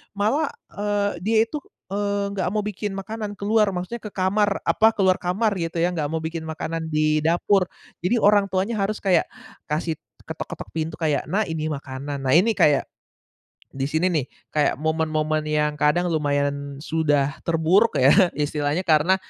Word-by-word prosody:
malah, 270 +10 +1 0.3
eee, 205 0 0
dia 220 +1 +2
itu, 300 - -8 0.4
eee, 200 0 -1
nggak 185 - -1
mau 215 - 0
bikin 210 0 -4
makanan 205 +2 -5
keluar 210 0 +2
maksudnya, 185 +6 -5
ke 210 - -6
kamar, 200 +2 +1
apa, 220 +1 +5
keluar 190 -3 +3
kamar 200 +4 0
gitu 165 -1 -3
ya, 170 - +3
nggak 150 -2 -1
mau 160 - -1
bikin 160 0 -4
makanan 160 +1 -4
di 155 0 +2
dapur, 180 +4 +3 0.4
jadi 230 +6 +2
orang 205 -2 +4
tuanya 195 +5 0
harus 210 +2 -2
kayak 185 -4 +3 0.5
kasih 160 +1 -1 0.3
ketok-ketok 160 - -6
pintu 160 0 -2
kayak, 155 -3 +1
"Nak 210 0 +1
ini 155 -1 -2
makanan," 140 0 -5
nah - - +2
ini 210 +7 +5
kayak 145 -2 +3 0.8
di 135 0 -2
sini 160 +4 +1
nih 150 -6 0 0.3
kayak 150 -1 +2
momen-momen 155 0 -1
yang 150 -1 0
kadang 170 +4 +2
lumayan 145 -2 -1
sudah 145 -3 +1
terburuk 170 +7 +3
ya 130 +2 +5 0.2
istilahnya 150 +3 -1
karena 160 +3 +4
165 Hz, 160 wpm, -23 LUFS, 155-200 Hz, 0.8 s, apa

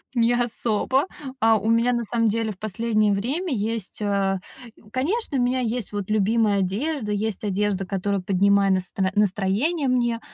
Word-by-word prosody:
не 235 0 +3
особо. 240 +2 +1 0.3
А, 225 -2 +4
у 215 +2 -2
меня 230 +2 +3
на 235 -1 0
самом 230 +1 0
деле 220 0 -1
в 190 - -12
последнее 215 0 +1
время 275 - -2
есть, 220 -2 -3
а 200 -2 0 0.5
Конечно, 300 - -1
у - - +2
меня 250 +1 +1
есть 240 -3 -2
вот 205 -1 -4
любимая 215 0 +2
одежда, 215 +5 -2
есть 210 0 -2
одежда, 200 -1 0
которая 195 +1 -1
поднимает 195 +1 +3
настро 185 +1 -1
настроение 210 - +1
мне. 240 -2 +1
215 Hz, 155 wpm, -24 LUFS, 200-240 Hz, 0.5 s, А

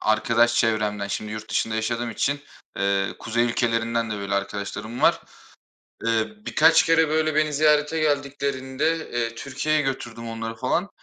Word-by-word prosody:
arkadaş 115 +2 +3
çevremden, 105 -3 +1
şimdi 105 +1 -4
yurt 110 +1 -7
dışında 115 0 0
yaşadığım 115 +2 -1
için, 140 +6 -1 0.4
eee, 100 0 +1
kuzey 115 +1 0
ülkelerinden 115 -1 0
de 105 - -2
böyle 100 0 -3
arkadaşlarım 100 +4 -4
var. - - +4 0.8
Eee, 115 -1 +1 0.2
birkaç 160 +2 +5
kere, 160 -1 +3
böyle, 155 0 +1
beni 155 0 +2
ziyarete 150 +1 +3
geldiklerinde, 140 +1 -1
eee, 115 -1 -2
Türkiye'ye 140 +5 -1
götürdüm 120 -4 -4
onları, 115 0 -5
falan, 150 +11 0
120 Hz, 140 wpm, -24 LUFS, 110-145 Hz, 0.8 s, birkaç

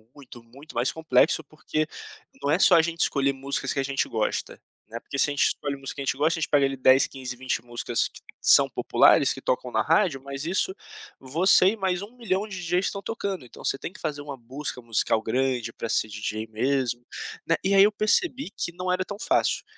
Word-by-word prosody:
Muito, 125 -4 -13
muito 135 +6 -15
mais 120 +2 +1
complexo, 160 0 +2
porque 155 +1 -3 0.5
não - - -1
é 155 - +4
só 185 - +6
a 165 - +7
gente 170 +1 -3
escolher 140 -1 +2
músicas 135 +1 -3
que - - -2
a - - +1
gente 135 0 -1
gosta, 110 -2 -2 0.3
né, 115 +2 -7
porque 140 - -6
se 145 - +3
a - - -2
gente 145 - +2
escolhe 145 -1 -3
música 135 0 -7
que - - -4
a - - -4
gente 130 0 0
gosta 160 +4 +1
a - - -6
gente - - -1
pega 145 -2 +4
ali 135 0 -1
10, 130 +1 +5
15, 130 -2 -7
20 130 -1 -2
músicas 120 0 -2
que - - -15 0.2
são - - +6
populares, - - +4
que - - -10
tocam - - -1
na - - +2
rádio, 135 - +2
mas 140 +1 -6
isso 190 - 0 0.5
você 170 +8 +4
e 225 - -6
mais 190 -3 -1
1000000 210 -2 -3
de 200 - -7
DJs 180 +2 0
estão 200 - -3
tocando. 200 - -4
Então, 120 - -12
você - - 0
tem 170 - -6
que 200 - -15
fazer 150 -2 -3
uma 145 -2 -7
música 130 +2 -6
musical 115 -1 0
grande 125 -1 -1
pra 115 - -5
ser - - +1
DJ 105 +1 -4
mesmo, 120 +1 -1 0.4
né, 165 - +2
e 195 - +2
aí 195 - +8
eu 210 - +5
percebi 255 - 0
que - - -2
não 180 +1 -3
era 185 +1 +1
tão 205 - -7
fácil, - - +1
140 Hz, 230 wpm, -25 LUFS, 130-180 Hz, 0.5 s, aí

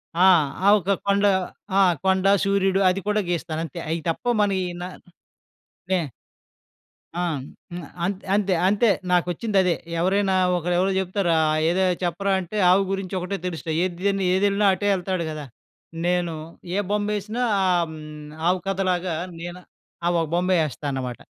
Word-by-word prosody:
ఆ! 180 +2 +4 0.4
ఆహ్, 205 - +7
ఒక 195 +2 -2 0.2
కొండ 200 +1 +3 0.5
ఆ! - - +6 0.2
కొండ, 190 0 +2 0.2
సూర్యుడు 195 -1 +2
అది 185 +2 0
కూడా 210 0 +2
గీస్తానంతే. 165 -3 -3
అయి 165 +1 -1
తప్ప 165 - -3 0.2
మన 205 -1 +2
ఈ - - -2 0.2
నా 180 - -4 1.0
నే 185 - +3 1.2
ఆ! 175 - -1 0.5
హ్మ్. 175 -3 -6 0.2
అంత్ 195 +1 -3
అంతె 200 -3 +1
అంతే. 210 +3 +3 0.2
నాకొచ్చిందదే. 180 +1 +2 0.2
ఎవరైనా 190 +2 +2 0.2
ఒకరెవరో 180 +3 +1
చెప్తారు 190 -1 0
ఆహ్, 155 0 +2
ఏదో 185 +2 +2 0.2
చెప్పరా 195 +3 0
అంటే, 190 +4 -5
ఆవు 195 +2 +5
గురించొకటే 190 0 -3
తెలుస్తయి. 160 -2 -2
ఏద్ 175 -2 -4
దని 195 -1 +1
ఏదెళ్ళినా 200 +1 +2
అటే 205 +2 -2
యెళ్తాడు 185 -2 -2
గదా! 150 -2 -6 0.6
నేను 175 -2 0 0.4
ఏ - - +1
బొమ్మేసినా 210 +3 -1 0.2
ఆహ్, 175 -2 +2
హ్మ్, 150 -1 -10 0.2
ఆవు 185 0 +1
కథలాగా 185 -3 0 0.2
నేను 175 +1 -7
ఆహ్, - - -55 0.3
ఆ - - +3
ఒక 160 - -2
బొమ్మే 180 +1 +2
యేస్తానమాట. 135 -4 -4
185 Hz, 145 wpm, -23 LUFS, 170-195 Hz, 1.2 s, ఆహ్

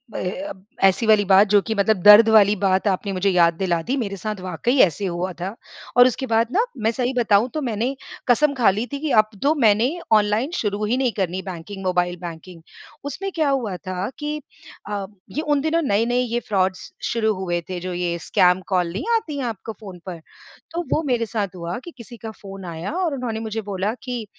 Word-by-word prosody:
ए, 180 - -2
अ, 300 - -5 0.3
ऐसी 195 +4 +4
वाली 215 -1 +5
बात, 195 +2 +6
जो 205 0 +4
कि 220 - -3
मतलब 200 +1 +2
दर्द 210 +2 +9
वाली 210 -1 +6
बात 190 +2 +2
आपने 195 +1 0
मुझे 190 +2 +1
याद 170 -2 +4
दिला 175 -3 0
दी। 255 +10 -2
मेरे 200 -5 -3
साथ 210 +1 -4
वाक़ई 235 +8 -1
ऐसे 185 +4 -4
हुआ 180 +1 -2
था 195 +5 -4 0.4
और 245 +1 +9
उसके 260 +2 -2
बाद 225 0 +2
ना, 435 +5 +3
मैं 220 0 +1
सही 250 +2 -1
बताऊँ, 225 +1 +3
तो 310 - -2
मैंने 240 +2 -1 0.3
कसम 285 +4 +4
खा 245 -6 +4
ली 210 +5 -1
थी 280 - -2
कि 310 -1 -2
अब 215 - -17
तो 295 +2 +4
मैंने 225 -1 +4 0.2
ऑनलाइन 215 +7 +2
शुरू 210 -1 -2
ही 240 +4 0
नहीं 255 -3 +1
करनी 185 -1 -1
बैंकिंग, 190 +1 -8
मोबाइल 180 -1 0
बैंकिंग। 170 0 -9 0.4
उसमें 380 +7 -4
क्या 310 -3 +2
हुआ 240 -8 -1
था 185 +2 -4
कि 300 +1 -3 0.5
अ, 200 -2 -3 0.3
ये 305 - -2
उन 295 -3 +1
दिनों 320 +2 +1
नए-नए 235 0 +1
ये 240 -1 -1
फ़्रॉड्स 190 -4 -1 0.2
शुरू 220 -2 +1
हुए 175 -2 -2
थे, 180 -1 -3
जो 180 0 -5
ये 175 -1 -1
स्कैम 180 +1 +4
कॉल 180 -3 +1
नहीं 220 +9 -4
आती 310 -10 -2
हैं 265 - -2
आपको 225 -1 -5
फ़ोन 190 -4 -9
पर? 175 -3 -6 0.5
तो 340 +1 -2
वो 315 - +2
मेरे 240 -2 +1
साथ 205 -4 -3
हुआ 170 +2 -4
कि 345 - -8
किसी 235 0 -11
का 220 -1 -7
फ़ोन 195 -2 -9
आया 170 - -5
और 345 -6 0
उन्होंने 235 -4 -3
मुझे 220 0 -4
बोला 200 +1 -2
कि 245 -3 -4
210 Hz, 215 wpm, -22 LUFS, 185-245 Hz, 0.5 s, दर्द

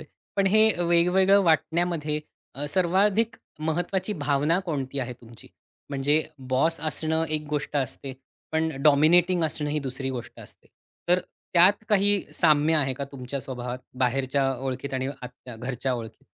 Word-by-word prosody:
आहे. 155 - -12 0.3
पण 195 -1 +2
हे 215 +3 +6
अ, 175 - -1
वेगवेगळं 180 +3 +4
वाटण्यामध्ये 160 -1 +1 0.3
अ, 145 +2 -4
सर्वाधिक 200 +6 +2 0.3
महत्त्वाची 180 +5 -1
भावना 145 +4 +2
कोणती 140 -4 -3
आहे 125 -1 -4
तुमची, 115 -1 -15 0.4
म्हणजे 145 +3 +1 0.3
बॉस 160 +5 +2
असणं 160 +1 0
एक 155 -1 -1
गोष्ट 145 0 -2
असते. 135 0 -3 0.4
पण 160 0 +1
डॉमिनेटिंग 165 +4 +4
असणं 150 -1 -2
ही 150 - 0
दुसरी 135 0 -4
गोष्ट 125 -3 -7
असते. - - -15 0.4
तर 180 +1 +5 0.4
त्यात 195 +5 +5
काही 205 -1 +3
साम्य 155 -1 +3
आहे 135 -3 +2
का 140 +2 -4
तुमच्या 130 +1 -5
स्वभावात 125 -1 -5 0.2
बाहेरच्या 135 +2 +1
ओळखीत 135 +1 -4
आणि 130 0 -1
आतच्या 125 -3 -10
घरच्या 125 +2 -3
ओळखीत? 115 -2 -8
150 Hz, 145 wpm, -26 LUFS, 135-175 Hz, 0.4 s, हे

